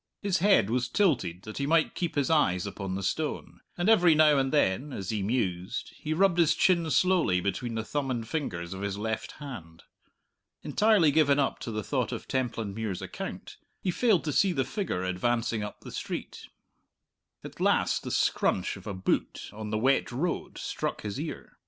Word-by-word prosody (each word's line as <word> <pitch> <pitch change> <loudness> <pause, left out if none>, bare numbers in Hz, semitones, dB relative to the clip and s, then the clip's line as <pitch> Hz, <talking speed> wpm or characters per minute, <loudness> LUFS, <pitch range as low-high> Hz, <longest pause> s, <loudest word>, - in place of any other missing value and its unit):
His 190 -2 +1
head 180 - +4
was 125 0 0
tilted 115 - +1
that 110 +4 -7
he 140 - -1
might 160 0 +3
keep 170 -3 -3
his 145 +1 +1
eyes 90 - +2
upon 100 -1 -4
the 100 - -4
stone; 155 - -3 0.2
and 175 +2 0
every 180 -7 +6
now 150 -2 +5
and 135 0 0
then, 140 0 +1
as 95 -5 -4
he 105 -2 -1
mused, 95 -4 -2
he 155 - -6
rubbed 175 +2 +3
his 165 -2 +4
chin 170 -3 +3
slowly 165 - +3
between 100 +6 -2
the 110 - -2
thumb 140 +3 -2
and 115 -3 -2
fingers 90 - -3
of 95 - -7
his 100 -1 -3
left 110 +1 -3
hand. 105 - -9 0.8
Entirely 210 -8 +4
given 145 -2 +4
up 140 -2 0
to - - -6
the 110 -1 -3
thought - - -1
of - - -6
Templandmuir's 110 -6 -2
account, - - -7 0.2
he 185 - -1
failed 205 0 +2
to 150 - -2
see 195 -2 +3
the 135 -5 0
figure 135 - -3
advancing 115 +5 0
up 105 0 -6
the - - -10
street. - - -6 1.0
At - - -10
last - - +2
the - - -6
scrunch 95 - +1
of 95 +2 -12
a 100 - -4
boot 95 - -2
on 105 0 -6
the 110 - -1
wet 130 +2 +2
road 165 +8 -3
struck - - -3
his 105 +4 -4
ear. 155 +1 -7
125 Hz, 190 wpm, -28 LUFS, 100-160 Hz, 1.0 s, every